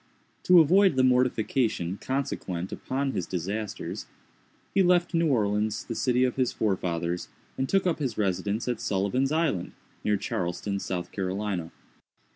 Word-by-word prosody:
To 180 -1 +8
avoid 185 +2 +5
the 130 - +3
mortification 125 -6 +1
consequent 100 -10 -3
upon 135 +1 -2
his 90 -9 -3
disasters, 100 +4 -4 0.7
he 195 - +4
left 175 -1 +3
New 165 0 +3
Orleans, 105 -4 +1
the 115 - -4
city 125 +2 +2
of 125 0 0
his 130 -2 +2
forefathers, 90 -4 -1 0.3
and 130 0 -2
took 195 -1 +2
up 175 -3 +1
his 130 -6 -2
residence 100 +2 -1
at 125 - -2
Sullivan's 105 +8 0
Island, 155 - 0 0.3
near 105 -1 +2
Charleston, 95 +2 -2
South 90 -2 -4
Carolina. 95 -3 -3
110 Hz, 140 wpm, -27 LUFS, 95-135 Hz, 0.7 s, To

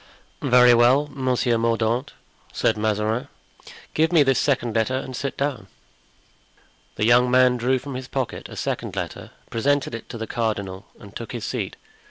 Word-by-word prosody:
"Very 125 0 +6
well, 125 +5 +5
Monsieur 125 -3 +1
Mordaunt," 115 +3 0 0.4
said - - +1
Mazarin, 110 +4 -1 0.7
"give 160 +1 +2
me 165 -4 +6
this 135 -2 +2
second 125 -5 0
letter 115 +3 +1
and 130 0 -4
sit 140 +2 -4
down." 135 -8 -2 1.3
The 105 - 0
young 120 +2 +5
man 125 0 +5
drew 125 +2 +1
from 140 +2 -7
his 130 0 -6
pocket 130 -3 -4
a - - -9
second - - -3
letter, - - -5 0.2
presented 140 +3 0
it 115 - -7
to - - -6
the 110 - -4
cardinal, 100 -5 -3
and 100 -1 -14
took 115 - -7
his 120 -3 -4
seat. - - -3
125 Hz, 165 wpm, -23 LUFS, 115-130 Hz, 1.3 s, Very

